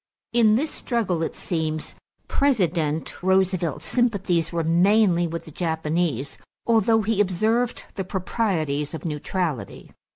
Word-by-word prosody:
In 225 -3 +5
this 300 +7 0
struggle, 210 -9 -1
it 165 - -2
seems, 155 -2 -3 0.3
President 170 - 0
Roosevelt's 185 -5 +1
sympathies 195 -9 +1
were 170 -1 -1
mainly 175 +1 +3
with 165 +1 -5
the 160 - -11
Japanese, 160 -4 -2 0.3
although 225 -1 +3
he 210 0 +2
observed 220 +6 0
the 195 - -3
proprieties 175 -7 -1
of 160 - -8
neutrality. 155 -2 -3
180 Hz, 120 wpm, -24 LUFS, 160-215 Hz, 0.3 s, In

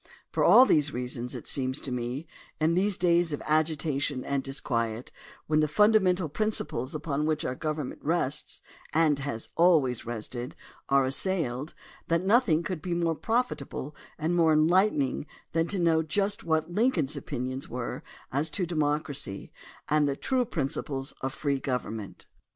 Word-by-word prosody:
For - - +1
all 255 - +8
these 150 - +3
reasons, 125 -1 -4
it - - -7
seems 130 0 -1
to 135 - -5
me, 125 +5 -3 0.3
in 160 +2 +3
these 190 +2 +1
days 170 -2 +3
of 145 - -3
agitation 150 -3 0
and 140 -1 0
disquiet, 120 -4 -2 0.3
when 155 0 +2
the 155 - +3
fundamental 190 -1 +4
prin 215 +9 0
ciples 150 - -2
upon 150 -1 -1
which 155 -1 0
our - - -1
government 150 -1 -4
rests 150 -2 -2 0.3
and 155 -3 +4
has 135 -5 -4
always 155 -9 +4
rested 120 +1 -5 0.3
are 135 -1 +4
assailed, 145 -2 -1 0.3
that 170 +1 +1
nothing 200 -6 +3
could 175 -2 -4
be 175 0 -2
more 170 -1 +1
profit 235 - 0
able 140 +1 -7 0.2
and 160 +3 0
more 165 -2 +4
enlightening 155 -3 +2 0.2
than 165 +1 +1
to 200 - -1
know 165 -2 +3
just 200 +6 -1
what 160 0 0
Lincoln's 175 - +1
opinions 130 -1 -4
were 120 -1 -4 0.3
as 145 +4 0
to 180 +4 -1
democracy 150 - -2 0.4
and 150 -1 +3
the 140 - -1
true 255 - 0
principles 135 -5 -3
of 135 - -2
free 140 -1 -1
government. 115 -6 -4
150 Hz, 155 wpm, -28 LUFS, 135-170 Hz, 0.4 s, all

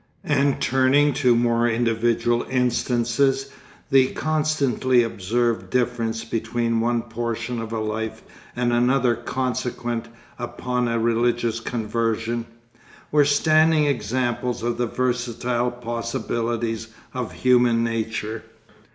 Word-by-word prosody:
And 140 -1 +1
turning 135 +3 +3
to 125 -3 +5
more 120 0 +2
individual 120 0 +1
instances 125 +2 +1 0.4
the 135 -1 +6
constantly 145 -5 +1
observed 115 -2 -1
difference 115 -2 -1
between 115 +1 -1
one 120 0 +1
portion 115 0 -3
of 115 0 -6
a 115 - -2
life 110 +1 -3 0.3
and 120 -1 0
another 125 +1 +3
consequent 120 -1 -3 0.3
upon 125 +1 -2
a 115 0 0
religious 115 0 +1
conversion, 115 0 -2 0.6
were 150 - +5
a 140 - +3
standing 155 +1 +4
example 125 -1 -1 0.2
of 120 0 -1
the 120 - +1
versatile 125 0 -1
possibilities 115 -1 -3 0.3
of - - -4
human 120 -2 +3
nature. 110 -1 -3
120 Hz, 110 wpm, -23 LUFS, 115-125 Hz, 0.6 s, the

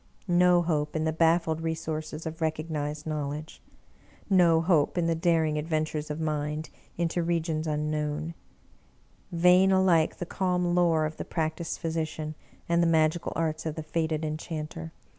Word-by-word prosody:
No 175 0 +4
hope 150 -3 -1
in 155 - 0
the 160 0 0
baffled 165 0 +2
resources 160 -1 -4
of 160 0 -6
recognized 155 -1 -2
knowledge! 150 0 -4 0.7
No 170 -4 +5
hope 165 -1 +2
in 175 - +2
the 165 - +2
daring 160 -2 +1
adven 155 +1 0
tures 155 -1 -4
of 150 +1 -4
Mind 150 0 -2 0.3
into 170 +1 0
regions 165 -2 -1
unknown; 150 +1 -2 1.0
vain 180 +2 +5
alike 185 -4 +3
the 175 - -4
calm 180 -1 0
lore 170 -3 +3
of 155 +1 -5
the - - -4
practiced 160 0 -3
physician, 155 -1 -3 0.3
and 170 0 +3
the 170 - +3
magical 160 +1 +2
arts 160 -1 -1
of 155 - -3
the 160 - -5
fated 160 -1 -1
Enchanter! 150 - -5
160 Hz, 150 wpm, -28 LUFS, 155-170 Hz, 1.0 s, No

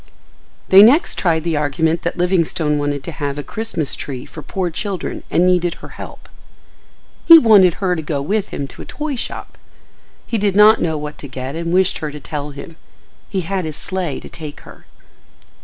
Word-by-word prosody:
They 190 +1 +9
next 255 +10 +5
tried 160 -3 +1
the 165 -1 -1
argument 160 +3 0
that 175 - -3
Livingstone 170 -4 +1
wanted 145 -1 -2
to 170 - -6
have 145 -2 -4
a 145 - -4
Christmas 180 -4 -3
tree 130 -3 -6
for 155 - -10
poor 180 +4 -3
children 190 +1 -4
and 175 - +2
needed 180 -2 +2
her - - -12
help. - - -11 1.0
He 335 - +12
wanted 205 - +6
her 185 -3 0
to 160 - -3
go 150 -2 -3
with 200 +9 -1
him 140 - -5
to - - -11
a - - -8
toy 300 -1 -4
shop. 245 - -6 0.7
He 230 - -2
did 200 -2 0
not 210 +2 +6
know 160 -2 0
what 150 0 -7
to 145 - -8
get 130 +2 -6
and 170 0 -3
wished 185 +1 +2
her 155 - -4
to 150 0 -9
tell 145 +1 -5
him. 145 +3 -10 0.5
He 195 -3 -1
had 185 +2 -3
his 155 -2 -5
sleigh 180 -7 -3
to - - -10
take 155 -3 -9
her. - - -15
170 Hz, 195 wpm, -18 LUFS, 150-190 Hz, 1.0 s, He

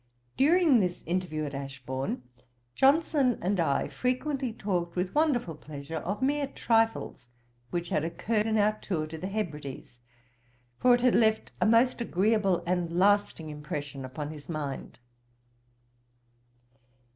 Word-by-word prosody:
During 310 -2 +5
this 180 -3 -1
interview 170 -3 -2
at 145 - -6
Ashbourne, 135 -1 -4 0.5
Johnson 275 - +3
and 190 +2 0
I 155 -5 +1
frequently 255 0 -1
talked 180 -6 -2
with 180 +1 -1
wonderful 290 - +1
pleasure 150 +1 -7
of 200 +9 -3
mere 285 +1 +1
trifles 225 - 0 0.4
which 175 -1 -3
had 150 - 0
occurred 210 +6 -1
in 220 0 +1
our 215 +1 +2
tour 160 -6 -2
to 155 +1 -7
the 185 - -4
Hebrides; 150 - -5 0.8
for 250 -1 +6
it 245 - -2
had 250 -1 +4
left 220 -1 +2
a - - +4
most 235 +3 +4
agreeable 195 -3 +1
and 175 -1 -1
lasting 195 -5 +2
impression 145 -2 -6
upon 145 +3 -5
his 150 0 -11
mind. 150 -4 -5
185 Hz, 135 wpm, -29 LUFS, 155-230 Hz, 0.8 s, for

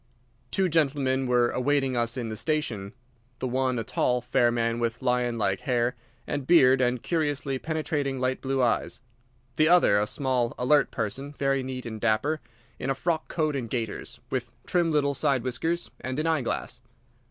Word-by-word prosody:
Two 190 +7 +1
gentlemen 135 -5 +1
were 120 -1 +3
awaiting 135 0 +1
us 120 +1 0
in 120 -3 -3
the 110 - -4
station—the 125 -2 -4
one 130 0 0
a 115 - -1
tall, 125 +2 +1
fair 120 0 +2
man 115 0 0
with 115 +1 -2
lion 125 -2 +1
like 95 -3 0
hair 120 -1 0 0.3
and 145 -3 -3
beard 130 -6 +6
and 125 -1 +1
curiously 145 -5 -1
penetrating 150 -4 -2
light 130 0 -1
blue 135 -1 0
eyes; 120 - 0 0.6
the 155 - +5
other 170 -13 +5
a 105 - 0
small, 125 -2 0
alert 145 +4 +3
person, 130 +5 -4
very 135 -1 +1
neat 130 -1 -5
and 110 -2 -6
dapper, 145 +8 +1 0.4
in 135 - -3
a 135 - +1
frock 165 +1 -1
coat 155 -3 -1
and 125 -4 -3
gaiters, 115 +1 -4
with 120 -3 -2
trim 175 -2 +1
little 145 -2 +2
side 135 -2 +1
whiskers 160 +8 -2
and 130 +1 -4
an 155 - 0
eye 160 -3 +2
glass. 120 - -3
130 Hz, 175 wpm, -27 LUFS, 120-145 Hz, 0.6 s, beard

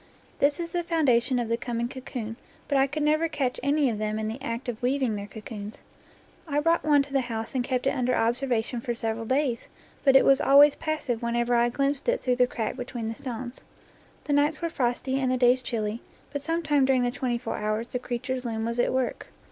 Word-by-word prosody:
This 285 +2 +3
is 335 -1 -4
the 350 - 0
foundation 265 -7 +2
of 240 -2 -1
the 230 +1 0
coming 235 -1 -2
cocoon, 245 -3 -6 0.3
but 285 - 0
I 270 0 +4
could 295 +2 -3
never 310 +2 +2
catch 270 -5 -1
any 285 +2 +2
of 220 -4 -1
them 215 0 -1
in 220 0 -2
the 230 +5 -6
act 235 -1 -4
of 235 -2 -4
weaving 255 -2 +1
their 200 0 -5
cocoons. 210 -1 -8 0.6
I 290 -1 +1
brought 330 +3 +2
one 290 -2 +4
to 275 - -12
the 270 - +3
house 225 -2 -4
and 255 -2 0
kept 250 0 -1
it 270 - +3
under 250 -2 0
observation 240 0 0
for 240 0 -3
several 225 -1 -3
days, 260 -1 0 0.4
but 270 -1 +5
it 270 - +7
was 275 +1 +5
always 285 +1 +7
passive 305 -7 -2
whenever 235 +1 0
I 240 0 +4
glimpsed 275 - -1
it - - 0
through 250 -1 +1
the 250 0 +4
crack 225 -2 -3
between 245 -3 -4
the - - -3
stones. 245 0 -6 0.6
The 290 - -1
nights 295 +2 +2
were 335 - -2
frosty 260 -1 -1
and 260 -1 0
the 255 - +1
days 250 +1 +4
chilly, 225 -2 -3 0.3
but 285 -1 -3
some 330 +3 -1
time 295 -3 +3
dur 265 - +3
ing 255 -1 +2
the 245 - +1
twenty 250 -2 -1
four 235 - -4
hours 215 +2 -1
the 250 - -4
creature's 250 +1 -3
loom 225 -2 -2
was 235 +1 -2
at - - +2
work. 260 -1 -2
250 Hz, 230 wpm, -26 LUFS, 235-280 Hz, 0.6 s, it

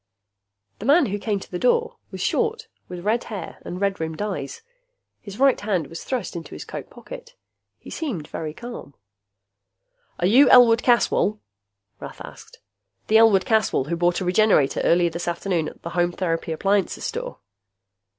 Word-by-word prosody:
The 215 - -5
man 295 +2 +5
who 205 -2 -3
came 205 -1 -1
to - - -13
the 180 - -4
door 465 - +1
was - - -7
short, 455 0 -1 0.2
with 180 0 -8
red 225 +3 +1
hair 200 -7 -7
and 180 - -6
red 200 -1 0
rimmed 160 -1 -4
eyes. 195 - -4 0.6
His 200 -1 -10
right 270 +1 +3
hand 195 -6 -1
was 165 +4 -9
thrust 250 -9 -4
into 170 - -7
his - - -8
coat - - -8
pocket. - - -11 0.4
He - - -13
seemed 215 - -4
very 155 -2 -5
calm. 235 - -9 1.2
"Are 175 - -1
you 250 +9 +6
Elwood 240 -2 +7
Caswell?" 225 -3 +2 0.6
Rath - - -9
asked. - - -12 0.5
"The 220 - +6
Elwood 215 -4 +5
Caswell 215 - +1
who 170 - 0
bought 175 +2 +1
a - - -2
Regenerator 180 -6 +3
early 175 0 +3
this 170 +1 -5
afternoon 175 -1 -1
at - - -18
the 170 - -6
Home 175 0 +1
Therapy 165 -3 -2
Appliances 195 +4 0
Store?" - - -5
195 Hz, 170 wpm, -23 LUFS, 170-235 Hz, 1.2 s, Elwood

